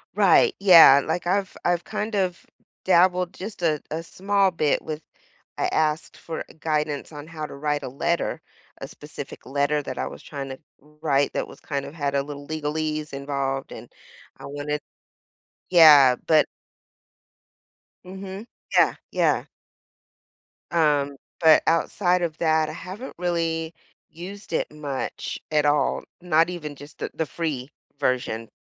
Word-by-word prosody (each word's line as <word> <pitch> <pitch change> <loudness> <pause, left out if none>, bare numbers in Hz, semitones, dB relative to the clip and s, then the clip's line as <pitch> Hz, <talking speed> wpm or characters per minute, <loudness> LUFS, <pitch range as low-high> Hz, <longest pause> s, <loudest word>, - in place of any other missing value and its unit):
Right, 455 - +5
yeah, 165 -8 +9
like, 170 +3 -2
I've 190 +2 0
I've 175 0 +1
kind 215 +1 -3
of 185 -3 -1 0.4
dabbled 180 0 +3
just 200 0 -8
a 155 -3 +1
a 160 +2 -3
small 195 +2 +1
bit 155 -4 +1
with 155 -1 -5 0.6
I - - +1
asked 155 0 0
for, 165 - -6
uh, - - -14
guidance 150 -2 -1
on 145 0 -9
how 155 -1 -6
to - - -7
write 150 +1 -1
a - - -4
letter, 170 +6 -1 0.4
a - - -5
specific - - -10
letter 145 +2 0
that 130 - -6
I - - -1
was - - -9
trying 140 -2 -6
to 130 - -8 0.2
wr 150 +2 -24
write 140 -3 +2
that - - -2
was - - -13
kind 140 -2 -3
of - - -9
had 145 -3 -2
a 140 - +2
little 145 0 -8
legalese 155 0 -3
involved, 135 -1 -3
and - - -10 0.5
I - - -9
wanted 145 +1 -3 0.9
Yeah, 150 -7 +8
but 155 -2 +5 1.6
Mhm. 190 +2 -8 0.3
Yeah, - - +5 0.2
yeah. - - +2 1.3
Um, 145 -4 +2 0.2
but 160 -2 +6
outside 175 +2 +2
of 165 -2 -2
that, 160 -1 +2
I - - -6
haven't 200 +8 -8
really 165 -2 -1 0.4
used 185 +4 -9
it - - -1
much 145 -3 -5
at 150 -1 +2
all, 145 0 +2 0.2
not 165 -1 +3
even 155 -5 -6
just 145 +2 -13
the - - -4
the 160 - -2
free 145 -2 -4 0.3
version. 115 -3 -1
155 Hz, 150 wpm, -24 LUFS, 145-175 Hz, 1.6 s, yeah